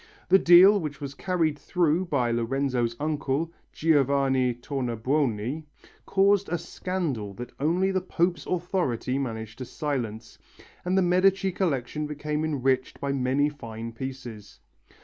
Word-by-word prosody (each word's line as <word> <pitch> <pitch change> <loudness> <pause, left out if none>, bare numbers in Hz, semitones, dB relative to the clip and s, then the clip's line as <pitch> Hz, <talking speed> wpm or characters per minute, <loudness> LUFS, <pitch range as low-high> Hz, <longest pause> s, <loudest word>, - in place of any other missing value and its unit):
The 190 - +7
deal, 185 +4 +7
which 150 -5 -5
was 140 -2 -6
carried 160 -2 -1
through 175 0 +1
by 125 -8 0
Lorenzo's 120 0 0
uncle, 150 +1 -1 0.2
Giovanni 135 -5 +2
Tornabuoni, 125 +1 -1 0.4
caused 200 0 +3
a 175 - 0
scandal 155 - -4
that 120 +4 -7
only 175 +7 +1
the 190 -1 0
Pope's 175 -3 -1
authority 165 -8 -1
managed 110 -4 -5
to 130 - -4
silence, 120 -7 -4 0.4
and 180 +2 0
the 190 - +4
Medici 190 +2 +3
collection 150 -4 -1
became 150 +1 -3
enriched 135 -4 0
by 140 - -2
many 135 +2 +1
fine 115 -6 -7
pieces. 125 -4 -8
145 Hz, 130 wpm, -26 LUFS, 125-175 Hz, 0.4 s, The